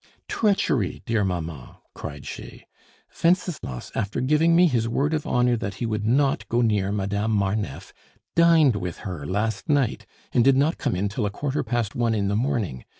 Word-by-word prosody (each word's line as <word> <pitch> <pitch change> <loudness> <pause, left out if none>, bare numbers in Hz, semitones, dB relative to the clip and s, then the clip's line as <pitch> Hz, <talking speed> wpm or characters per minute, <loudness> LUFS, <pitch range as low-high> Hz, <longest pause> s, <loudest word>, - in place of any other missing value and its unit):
"Treachery, 190 - 0
dear 115 -2 +1
mamma!" 85 -6 -4
cried - - -8
she. - - -9 0.6
"Wenceslas, 170 - 0
after 105 -2 -2
giving 155 +5 +3
me 180 +1 +6
his 120 -8 +1
word 145 +6 0
of 155 -2 -2
honor 125 0 +2
that 100 -4 -4
he 110 - -3
would 110 -1 -2
not 135 +3 +1
go 120 +1 +2
near 105 -4 +1
Madame 100 +1 -1
Marneffe, 100 -6 -1 0.4
dined 165 -7 +5
with 90 -4 -4
her 85 -7 -5
last 105 +4 -2
night, 140 -5 +1 0.3
and 120 - +4
did 135 +1 +5
not 145 +4 +1
come - - -1
in 95 +3 0
till 105 +1 -2
a - - -1
quarter 140 +7 -2
past 120 -3 -1
one 115 -2 +1
in 100 -2 0
the 100 - 0
morning. 105 - -1
115 Hz, 180 wpm, -24 LUFS, 100-135 Hz, 0.6 s, me